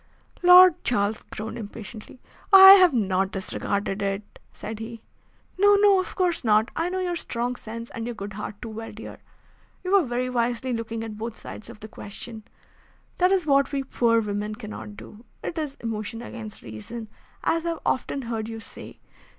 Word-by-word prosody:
Lord 360 -1 +8
Charles 215 -3 0
groaned 220 +2 -7
impatiently. 220 +2 -9 0.3
"I 385 -1 +12
have 375 -3 +8
not 195 -6 +1
disregarded 200 +1 -3
it," 200 +1 -4
said 215 0 -7
he. 225 0 -8 0.6
"No, 410 +1 +6
no, 400 -2 +5
of 370 - -4
course 360 -5 0
not. 215 0 +3
I 330 +2 0
know 370 - -3
your 355 -1 -1
strong 245 -5 -3
sense, 230 0 -8
and 230 0 -5
your 240 - -4
good 205 -1 -7
heart 210 0 -7
too 230 - -6
well, 225 +1 -7
dear. 215 +1 -10 0.6
You 365 - -3
were 400 -1 +6
very 245 +1 -1
wisely 245 +1 -1
looking 230 -1 -4
at 215 -2 -7
both 230 0 -5
sides 215 - -9
of 230 -2 -12
the 215 - -8
question. 220 +1 -9 0.7
That 365 +1 +4
is 380 -4 +2
what 280 -2 +3
we 275 -1 -1
poor 235 -3 +2
women 210 0 -3
cannot 210 -2 -9
do. 215 +3 -12 0.2
It - - -4
is 295 -2 -4
emotion 225 0 -4
against 220 -3 -9
reason, 120 - -8 0.4
as 330 0 +1
I 340 - -1
have 330 -2 -3
often 270 +1 -1
heard 225 -2 -4
you 225 0 -6
say. - - -11
230 Hz, 185 wpm, -25 LUFS, 215-280 Hz, 0.7 s, I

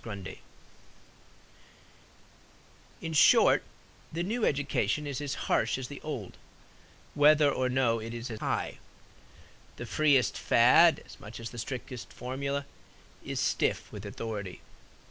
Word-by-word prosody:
GRUNDY 100 -4 -8 2.6
In 165 -1 -4
short, 150 - +6 0.5
the 170 +2 -2
new 220 +5 -2
education 145 0 0
is 140 -1 -4
as 145 -2 -3
harsh - - +1
as 130 -1 -6
the 145 - -9
old, 135 -11 -6 0.8
whether 150 0 +5
or 130 -1 0
no 125 -3 +2
it 115 +1 -6
is 120 +1 -6
as 110 - -6
high. - - -2 1.0
The - - -7
freest 145 -5 +2
fad, 125 +8 +5
as - - -14
much 105 +2 -10
as 115 0 -6
the 120 - -8
strictest 125 +1 -6
formula, 140 +2 -4 0.6
is - - -4
stiff - - 0
with 105 -2 -8
authority. 100 -2 -6
130 Hz, 125 wpm, -29 LUFS, 115-145 Hz, 2.6 s, short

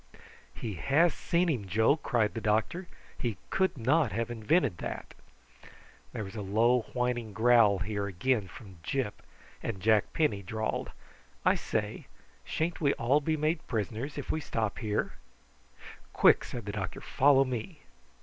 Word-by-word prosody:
"He 110 -3 -4
has 145 - +3
seen 175 +1 +1
him, 120 - -1
Joe," 110 +8 +3
cried 120 -8 0
the 115 - -4
doctor. 110 - 0 0.3
"He 115 -6 -2
could 190 -5 +1
not 130 +2 +2
have 115 +3 -2
invented 115 - +1
that." - - -6 1.0
There - - -4
was 95 +1 -9
a 105 - -4
low 115 +4 +2
whining 125 -3 -1
growl 110 -2 +5
here 100 +1 -2
again 100 +3 0
from 95 -2 -13
Gyp, 125 +3 -2 0.4
and 105 -4 -4
Jack 110 +1 +3
Penny 150 -11 +1
drawled: 110 +3 -3 0.6
"I - - +6
say, 105 -1 -3 0.4
sha'n't 170 +2 -2
we 140 -2 +3
all 130 +6 +2
be 155 +2 0
made 155 +2 -1
prisoners 115 +5 -3
if 145 - -3
we 155 - -1
stop 110 -7 -2
here?" 105 -2 -1 1.0
"Quick!" - - +5
said 120 -4 -6
the 100 - -3
doctor; 100 -3 -4
"follow 135 0 +4
me." 130 - -5
115 Hz, 150 wpm, -30 LUFS, 105-140 Hz, 1.0 s, I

